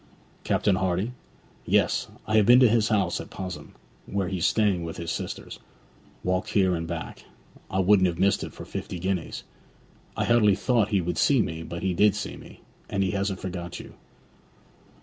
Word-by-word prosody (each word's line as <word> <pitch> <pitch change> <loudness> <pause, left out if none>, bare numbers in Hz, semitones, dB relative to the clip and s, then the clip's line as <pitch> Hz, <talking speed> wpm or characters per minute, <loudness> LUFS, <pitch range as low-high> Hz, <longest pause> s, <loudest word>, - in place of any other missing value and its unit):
'Captain 100 -3 +2
Hardy?' 95 +5 0 0.5
'Yes. - - +2 0.2
I 110 0 +2
have 105 - +4
been 120 +1 +8
to 125 - +8
his 110 -1 +3
house 105 -4 +1
at - - -11
Pos'ham, 95 -1 -7 0.3
where 95 -2 -1
he's 95 -3 +1
staying 100 -6 +2
with 80 0 -6
his 85 -1 -4
sisters; - - -5 0.6
walked 95 +4 -1
there 95 -3 +4
and 85 -1 -3
back, 80 -1 -5
and - - -23
I 95 - -1
wouldn't 95 0 +5
have 85 -1 -2
missed 100 +1 +2
it - - -6
for - - -10
fifty - - -6
guineas. 90 -1 -3 0.7
I - - +1
hardly 110 -4 +4
thought 115 -3 +2
he 100 -3 +2
would 90 +1 -2
see 135 -6 +4
me; 80 +1 -5
but 85 +1 -6
he 95 -1 +1
did 105 +3 +4
see 105 - -4
me. - - -14 0.3
And 100 -1 0
he 95 - 0
hasn't 100 -1 -2
forgot 90 -2 -5
you.' - - -11
95 Hz, 190 wpm, -26 LUFS, 90-105 Hz, 0.7 s, been